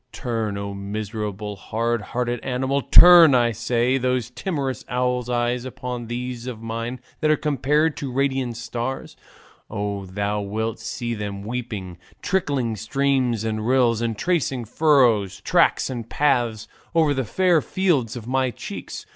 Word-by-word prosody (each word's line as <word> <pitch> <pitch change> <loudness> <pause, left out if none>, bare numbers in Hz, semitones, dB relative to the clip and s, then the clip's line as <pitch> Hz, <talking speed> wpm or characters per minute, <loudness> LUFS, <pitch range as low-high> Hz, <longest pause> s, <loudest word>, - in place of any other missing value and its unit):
Turn, 110 -4 -3
O 100 0 -4
miserable, 105 +1 -5
hard 115 +4 -2
hearted 120 +2 -2
animal, 130 +3 -1
turn, 170 -2 +8
I 120 -1 +3
say, 120 +3 0
those 125 -2 -1
timorous 140 -4 -3
owl's 125 -1 -1
eyes 120 0 0
upon 125 -2 -6
these 120 0 -5
of 120 -4 -5
mine 115 +2 -4 0.2
that 155 - +1
are 155 - +4
compared 150 +2 +1
to 135 -3 -4
radiant 130 -2 -1
stars, 120 +2 -5 0.5
and 100 -3 -4
thou 100 +2 -2
wilt 110 +3 -3
see 120 -1 -4
them 100 -2 -5
weeping 105 -6 -5 0.2
trickling 140 -11 0
streams 125 0 0
and 110 0 -2
rills, 120 -3 +3
and 115 -2 -2
tracing 135 -8 0
furrows, 120 - +3
tracks, - - +3
and 120 -3 -6
paths 120 -7 +1 0.3
over 160 -3 +4
the 130 -1 -1
fair 175 - +2
fields 160 - 0
of 120 -3 -7
my 130 +1 +1
cheeks. - - -7
120 Hz, 145 wpm, -23 LUFS, 110-130 Hz, 0.5 s, turn